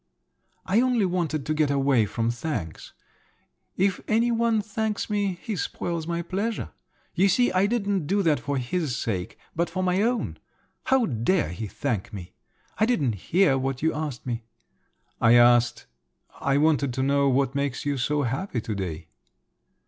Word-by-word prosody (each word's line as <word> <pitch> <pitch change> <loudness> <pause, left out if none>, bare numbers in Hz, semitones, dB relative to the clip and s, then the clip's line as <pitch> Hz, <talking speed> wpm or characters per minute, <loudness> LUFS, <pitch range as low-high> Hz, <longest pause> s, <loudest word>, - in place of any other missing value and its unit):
"I 200 +5 +3
only 250 -5 +2
wanted 170 -6 -1
to 155 - 0
get 155 -2 +1
away 135 -5 +2
from 115 +2 -1
thanks. 120 - -5 0.8
If 190 -1 +1
any 230 +2 +2
one 230 -1 +2
thanks 215 0 -3
me, 200 -3 0
he 220 - -3
spoils 170 -2 -3
my 170 0 -2
pleasure. 200 +6 -3 0.4
You 190 +3 +3
see 245 +6 +3
I 185 +2 +3
didn't 200 -7 -1
do 200 +3 +1
that 155 -4 +2
for 145 -1 -2
his 130 +1 -2
sake, 95 -5 -3 0.2
but 170 +2 0
for 185 0 -2
my 185 +1 +2
own. 240 +2 -1 0.5
How 265 -3 +3
dare 120 - +1
he 105 +6 -5
thank 115 -2 -3
me? 90 -4 -8 0.5
I 220 - +4
didn't 145 - +1 0.2
hear 170 -7 +4
what 135 +1 -3
you 160 - +2
asked 150 -5 -4
me." 120 -2 -3 0.8
"I 115 0 +6
asked… 120 0 +4 0.5
I 140 0 +1
wanted 145 -4 +2
to 130 - 0
know 140 0 +3
what 135 0 +1
makes 140 -2 -2
you 145 -2 -1
so 145 +3 0
happy 135 - -2
to 110 0 -4
day." 90 -5 -5
150 Hz, 165 wpm, -25 LUFS, 125-195 Hz, 0.8 s, I